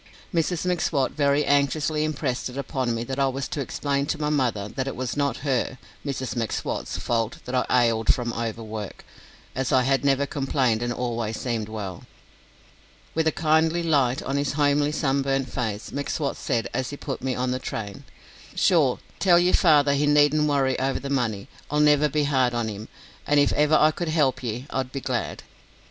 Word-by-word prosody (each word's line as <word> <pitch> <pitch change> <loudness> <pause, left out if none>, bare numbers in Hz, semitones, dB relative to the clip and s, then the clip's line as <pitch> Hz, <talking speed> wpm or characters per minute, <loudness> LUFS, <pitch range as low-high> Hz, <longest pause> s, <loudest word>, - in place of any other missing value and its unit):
Mrs 170 +1 0
M'Swat 160 -6 +1
very 145 0 +2
anxiously 145 +2 +1
impressed 140 -5 -2
it 125 - -9
upon 130 -3 -2
me 115 - -2
that 130 +3 -4
I 135 - +3
was 135 0 -3
to 145 - -3
explain 140 +2 -1
to 155 - -2
my 150 -1 0
mother 120 -8 0
that 130 +5 -4
it 135 - -3
was 125 -1 -3
not 140 -4 0
her 130 -1 0 0.3
(Mrs 130 -4 -3
M'Swat's) 115 -2 -3
fault 115 -1 -1
that 125 - -6
I 125 -1 +3
"ailed" 115 -1 +3
from 120 -2 -2
overwork, 110 -3 -5 0.5
as 130 0 -2
I 130 - +4
had 135 +1 +1
never 140 0 +2
complained 135 -5 0
and 120 0 -1
always 120 -3 -3
seemed 115 -4 -2
well. 100 -5 -6 1.1
With 160 0 +1
a - - +4
kindly 160 +1 +2
light 135 -6 +2
on 135 +1 -2
his 140 -1 0
homely 145 0 +2
sunburnt 135 -3 0
face, 110 -4 -3
M'Swat 140 0 -2
said, 115 -1 -1
as 130 - -2
he 145 - -6
put 140 -3 -5
me 130 0 -1
on 125 0 -1
the 130 - -1
train: 105 -5 -6 0.5
"Sure, - - +3 0.2
tell 180 -3 +5
yer 175 +1 +3
father 145 -4 +5
he 145 +1 +1
needn't 150 +1 +4
worry 135 -3 +1
over 135 +1 0
the 140 - -5
money. 115 -7 -1 0.2
I'll 150 - 0
never 150 0 +4
be 150 +1 +1
hard 130 -4 +2
on 115 -2 -1
him, 105 +1 -7 0.4
an' 145 - +3
if 145 0 +4
ever 150 +1 +3
I 155 0 +5
could 170 +1 -4
help 140 -5 +1
ye, 120 +1 -4
I'd 130 -1 -2
be 135 - -4
glad." 125 -3 -3
135 Hz, 190 wpm, -25 LUFS, 120-145 Hz, 1.1 s, tell